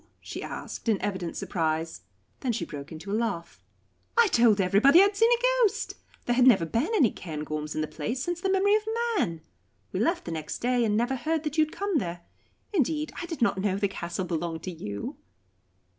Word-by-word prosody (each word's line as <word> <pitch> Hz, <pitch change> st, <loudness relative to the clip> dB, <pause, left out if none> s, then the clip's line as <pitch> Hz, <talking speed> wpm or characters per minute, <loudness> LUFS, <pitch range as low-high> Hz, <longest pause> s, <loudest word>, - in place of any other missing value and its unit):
she -, -, -7 dB
asked, -, -, -5 dB
in 210 Hz, -4 st, +2 dB
evident 185 Hz, -4 st, -3 dB
surprise. 165 Hz, -, -2 dB, 0.4 s
Then 255 Hz, -, -1 dB
she 230 Hz, -, -2 dB
broke 145 Hz, 0 st, -8 dB
into 165 Hz, +5 st, -7 dB
a -, -, -1 dB
laugh. 210 Hz, -7 st, -2 dB, 0.6 s
"I 470 Hz, -3 st, +6 dB
told 230 Hz, -, +4 dB
everybody 200 Hz, -, +5 dB
I -, -, +9 dB
had 400 Hz, 0 st, +2 dB
seen 455 Hz, +3 st, +4 dB
a 480 Hz, 0 st, +3 dB, 0.2 s
ghost; 420 Hz, -2 st, +1 dB, 0.3 s
there 245 Hz, -, +2 dB
had 250 Hz, 0 st, +5 dB
never 195 Hz, -9 st, +6 dB
been 230 Hz, -, 0 dB
any 265 Hz, -, +4 dB
Cairngorms 155 Hz, -2 st, -5 dB
in 155 Hz, -, 0 dB
the 155 Hz, -, -1 dB
place 235 Hz, +10 st, -4 dB
since 350 Hz, +5 st, -3 dB
the 385 Hz, -, 0 dB
memory 390 Hz, +2 st, +3 dB
of 430 Hz, -, +2 dB, 0.4 s
man. 165 Hz, -, -1 dB, 0.5 s
We -, -, -2 dB
left 340 Hz, +1 st, +1 dB
the 170 Hz, -, -4 dB
next 155 Hz, -2 st, -4 dB
day, 245 Hz, 0 st, +1 dB
and 210 Hz, -1 st, +1 dB
never 245 Hz, +4 st, +1 dB
heard 315 Hz, +4 st, -1 dB
that 305 Hz, 0 st, -2 dB
you 310 Hz, -, +6 dB
had 310 Hz, -, -14 dB
come 400 Hz, -6 st, 0 dB
there; 175 Hz, -4 st, -4 dB, 0.5 s
indeed, 305 Hz, -, 0 dB
I 340 Hz, -, -5 dB
did 330 Hz, -7 st, -2 dB
not 195 Hz, -4 st, +2 dB
know 195 Hz, -1 st, 0 dB
the 200 Hz, 0 st, +1 dB
castle 175 Hz, -1 st, -4 dB
belonged 165 Hz, -1 st, -3 dB
to 185 Hz, -, -4 dB
you." 105 Hz, -, -6 dB
215 Hz, 210 wpm, -27 LUFS, -, 0.6 s, I